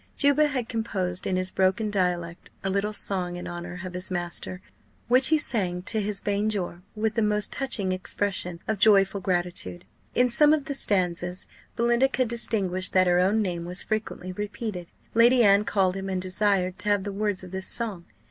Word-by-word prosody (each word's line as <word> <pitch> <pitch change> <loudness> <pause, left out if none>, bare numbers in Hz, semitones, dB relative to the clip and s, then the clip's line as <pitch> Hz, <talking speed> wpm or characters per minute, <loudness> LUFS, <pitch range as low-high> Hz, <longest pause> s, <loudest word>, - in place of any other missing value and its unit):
Juba 285 +1 +4
had 255 -5 -2
composed, 190 -6 -2
in 185 - 0
his 185 0 0
broken 195 +3 +1
dialect, 175 -3 -2
a 195 - -1
little 200 +2 0
song 185 -4 -2
in 175 - -6
honour 175 +1 -6
of 185 - -6
his 180 +1 -4
master, 175 0 -4 0.5
which 255 +2 +5
he 315 - +4
sang 185 -11 -2
to 220 +3 -1
his 205 -1 -1
banjore 200 -4 -1
with 215 0 0
the 225 - 0
most 210 -1 +1
touching 225 -9 -1
expression 185 -1 -2
of 220 -3 -1
joyful 200 -2 +4
gratitude. 175 - -2 0.3
In 250 0 +3
some 300 +5 +6
of 305 -2 0
the 290 - -3
stanzas 180 -6 0 0.3
Belinda 235 +3 +3
could 255 -3 0
distinguish 195 -6 0
that 185 -1 +3
her 175 0 +3
own 205 +4 +3
name 175 -3 -3
was 180 +2 -3
frequently 215 -4 -3
repeated. 205 -2 -5 0.3
Lady 240 +2 +5
Anne 200 0 +5
called 190 -3 +1
him, 195 0 -4
and 190 -1 -1
desired 185 0 0
to 210 - -2
have 205 -2 +2
the 200 0 -4
words 205 -2 -2
of 180 - -10
this 190 0 -4
song. 210 -7 -2
195 Hz, 185 wpm, -26 LUFS, 180-220 Hz, 0.5 s, some